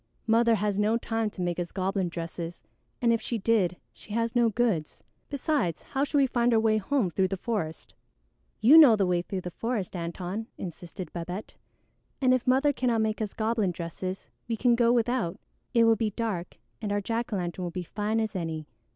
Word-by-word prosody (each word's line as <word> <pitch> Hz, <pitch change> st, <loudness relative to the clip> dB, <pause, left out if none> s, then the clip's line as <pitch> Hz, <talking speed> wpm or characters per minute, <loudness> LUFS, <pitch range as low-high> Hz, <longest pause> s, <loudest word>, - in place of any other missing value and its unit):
Mother 230 Hz, 0 st, +4 dB
has 205 Hz, -1 st, 0 dB
no 215 Hz, +2 st, +3 dB
time 225 Hz, -2 st, -1 dB
to 190 Hz, -3 st, -5 dB
make 175 Hz, 0 st, -1 dB
us 175 Hz, -1 st, -3 dB
goblin 190 Hz, -1 st, -1 dB
dresses, 170 Hz, 0 st, -6 dB, 0.4 s
and 235 Hz, -1 st, +5 dB
if 230 Hz, -, 0 dB
she 235 Hz, -, -2 dB
did, 195 Hz, -5 st, +2 dB, 0.2 s
she 210 Hz, -, -11 dB
has 230 Hz, +1 st, 0 dB
no 240 Hz, -1 st, +4 dB
goods; 215 Hz, -9 st, -1 dB, 0.3 s
besides, 280 Hz, -, -1 dB
how 270 Hz, 0 st, -1 dB
should 290 Hz, 0 st, 0 dB
we 275 Hz, -, +5 dB
find 240 Hz, -2 st, +2 dB
our -, -, +5 dB
way 220 Hz, -1 st, +3 dB
home 215 Hz, -3 st, 0 dB
through 190 Hz, +3 st, +2 dB
the 195 Hz, +1 st, -3 dB
forest?" 180 Hz, -7 st, -4 dB, 0.7 s
"You 275 Hz, +9 st, +9 dB
know 270 Hz, -8 st, +9 dB
the 200 Hz, -2 st, +2 dB
way 180 Hz, -1 st, +1 dB
through 185 Hz, +1 st, -4 dB
the 180 Hz, -, -6 dB
forest, 220 Hz, -1 st, -3 dB
Antone," 180 Hz, +5 st, -4 dB
insisted 175 Hz, -1 st, -7 dB
Babette, 180 Hz, +4 st, -5 dB, 0.7 s
"and 255 Hz, -2 st, +4 dB
if 255 Hz, -1 st, 0 dB
Mother 270 Hz, +3 st, +4 dB
cannot 240 Hz, -4 st, +1 dB
make 220 Hz, 0 st, -1 dB
us 210 Hz, -2 st, -3 dB
goblin 220 Hz, -2 st, +1 dB
dresses, 180 Hz, +2 st, -5 dB, 0.2 s
we 230 Hz, -, -1 dB
can 245 Hz, +1 st, +3 dB
go 235 Hz, 0 st, +4 dB
without. 240 Hz, -6 st, 0 dB, 0.3 s
It 235 Hz, -2 st, +4 dB
will 225 Hz, 0 st, +5 dB
be 220 Hz, 0 st, 0 dB
dark 205 Hz, -5 st, -4 dB, 0.2 s
and 210 Hz, -2 st, -2 dB
our 205 Hz, -, +1 dB
jack 230 Hz, +4 st, -2 dB
o' -, -, 0 dB
lantern 180 Hz, -1 st, -3 dB
will 175 Hz, -, -2 dB
be 180 Hz, +2 st, -4 dB
as -, -, -8 dB
fine 215 Hz, +1 st, -1 dB
as 220 Hz, -2 st, -2 dB
any. 160 Hz, -3 st, -3 dB
215 Hz, 205 wpm, -28 LUFS, 180-235 Hz, 0.7 s, You